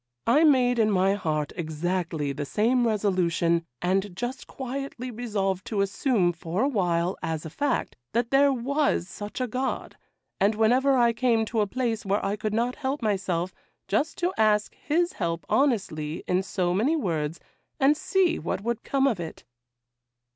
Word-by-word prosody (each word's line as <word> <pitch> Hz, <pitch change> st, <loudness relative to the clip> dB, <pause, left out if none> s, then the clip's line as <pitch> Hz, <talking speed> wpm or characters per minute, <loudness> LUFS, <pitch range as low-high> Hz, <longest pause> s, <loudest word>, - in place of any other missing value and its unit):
I 290 Hz, +7 st, +4 dB
made 250 Hz, -5 st, +4 dB
in 215 Hz, -1 st, +4 dB
my 195 Hz, -1 st, +3 dB
heart 155 Hz, -7 st, -2 dB
exactly 160 Hz, -2 st, -2 dB
the 145 Hz, -, -4 dB
same 235 Hz, -, +2 dB
resolution, 175 Hz, -5 st, +1 dB, 0.2 s
and 190 Hz, +1 st, 0 dB
just 245 Hz, +6 st, -4 dB
quietly 265 Hz, -1 st, -5 dB
resolved 205 Hz, -5 st, -2 dB
to 210 Hz, -3 st, 0 dB
assume 195 Hz, -2 st, +1 dB
for 170 Hz, +5 st, -2 dB
a -, -, +3 dB
while, 180 Hz, -7 st, 0 dB
as 160 Hz, -1 st, -3 dB
a 160 Hz, -, -6 dB
fact, 285 Hz, -, -1 dB, 0.2 s
that 235 Hz, +1 st, 0 dB
there 280 Hz, +1 st, +5 dB
was 270 Hz, -, 0 dB
such 205 Hz, +4 st, -7 dB
a 255 Hz, -, +1 dB
God, 255 Hz, +3 st, -3 dB, 0.4 s
and 205 Hz, +3 st, +3 dB
whenever 255 Hz, +5 st, +3 dB
I 235 Hz, -1 st, +4 dB
came 230 Hz, -2 st, +2 dB
to 220 Hz, 0 st, 0 dB
a 205 Hz, -, +1 dB
place 235 Hz, -1 st, -2 dB
where 200 Hz, 0 st, 0 dB
I 200 Hz, +1 st, 0 dB
could 215 Hz, 0 st, -3 dB
not 235 Hz, +3 st, 0 dB
help 270 Hz, -1 st, -2 dB
myself, 185 Hz, -4 st, -1 dB, 0.3 s
just 215 Hz, +11 st, 0 dB
to 355 Hz, +2 st, 0 dB
ask 210 Hz, -1 st, +3 dB
His 340 Hz, +4 st, 0 dB
help 165 Hz, -2 st, -3 dB
honestly 175 Hz, -, 0 dB
in 180 Hz, +1 st, +2 dB
so 185 Hz, -2 st, -1 dB
many 240 Hz, -, +2 dB
words, 165 Hz, -, -2 dB, 0.4 s
and 275 Hz, +2 st, +5 dB
see 370 Hz, +1 st, +1 dB
what 175 Hz, +3 st, -3 dB
would 235 Hz, +1 st, -2 dB
come 275 Hz, -1 st, +1 dB
of 235 Hz, -9 st, +1 dB
it. 165 Hz, -2 st, -7 dB
215 Hz, 170 wpm, -26 LUFS, 180-255 Hz, 0.4 s, there